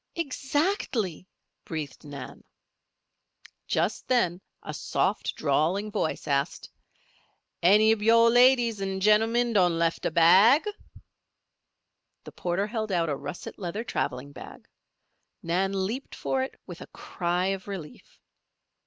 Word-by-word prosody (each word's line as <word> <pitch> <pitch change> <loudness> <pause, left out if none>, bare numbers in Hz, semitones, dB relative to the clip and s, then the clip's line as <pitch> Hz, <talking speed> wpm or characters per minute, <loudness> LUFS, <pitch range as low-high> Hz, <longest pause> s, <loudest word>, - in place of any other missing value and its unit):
"Exactly," 275 - -2 0.4
breathed 155 -4 -6
Nan. 145 -3 -9 1.2
Just - - -1
then 190 -8 +1 0.2
a - - -6
soft, - - -1
drawling 165 +8 0
voice 200 -6 -2
asked: 140 -1 -2 0.9
"Any 210 +5 +5
ob 220 - -5
yo' 230 +2 +5
ladies 245 -2 +4
an' 195 0 -2
gemmen 225 +4 +3
done 180 -5 +3
lef' 165 0 0
a - - +1
bag?" 190 - +5 1.6
The - - -11
porter 175 +3 -2
held 215 -1 -4
out 170 -3 +1
a 145 - 0
russet 145 +9 -8
leather 195 +4 -4
traveling 135 - -3
bag. - - -12 0.8
Nan 190 +3 0
leaped 245 +8 -5
for 265 - -1
it 265 - -5
with - - -10
a - - -9
cry 175 0 -3
of 195 0 -8
relief. 185 -7 -9
195 Hz, 120 wpm, -27 LUFS, 170-230 Hz, 1.6 s, Any